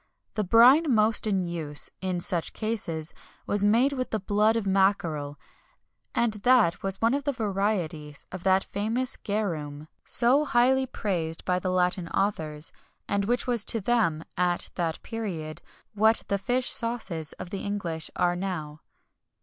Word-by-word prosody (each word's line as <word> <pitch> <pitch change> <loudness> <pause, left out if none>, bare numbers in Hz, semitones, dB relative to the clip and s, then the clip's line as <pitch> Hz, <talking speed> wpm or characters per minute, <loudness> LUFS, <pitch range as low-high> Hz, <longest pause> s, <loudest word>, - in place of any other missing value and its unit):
The 215 - -1
brine 245 - +6
most 220 -1 +4
in 195 -3 +1
use, 160 -4 -1
in 185 -2 -2
such 170 -1 0
cases, 170 -8 -3 0.3
was 205 0 +2
made 235 +7 +3
with 255 -2 -3
the 220 - -1
blood 210 +3 +2
of 225 -3 -1
mackerel, 175 -7 0 0.8
and 235 -2 +1
that 245 -8 +4
was 195 0 -3
one 230 +2 +2
of 280 0 -1
the 285 - 0
varieties 195 - -2
of 185 - -6
that 190 +1 +3
famous 225 +6 -1
garum 155 -8 -4
so 255 +5 +5
highly 260 0 +2
praised 170 -9 -3
by 180 0 +1
the 185 - -3
Latin 180 -1 +1
authors, 160 -6 -2 0.4
and 200 0 0
which 245 +3 0
was 240 -4 +1
to 225 - +1
them, 200 -8 +1
at 175 -1 0
that 165 -3 -3
period, 180 -9 -5 0.3
what 220 +2 +3
the 200 - 0
fish 245 +5 -1
sauces 215 -10 -1
of 175 - -9
the 195 - -4
English 175 -6 -3
are 175 0 +1
now. 160 -5 -5
195 Hz, 155 wpm, -26 LUFS, 170-225 Hz, 0.8 s, brine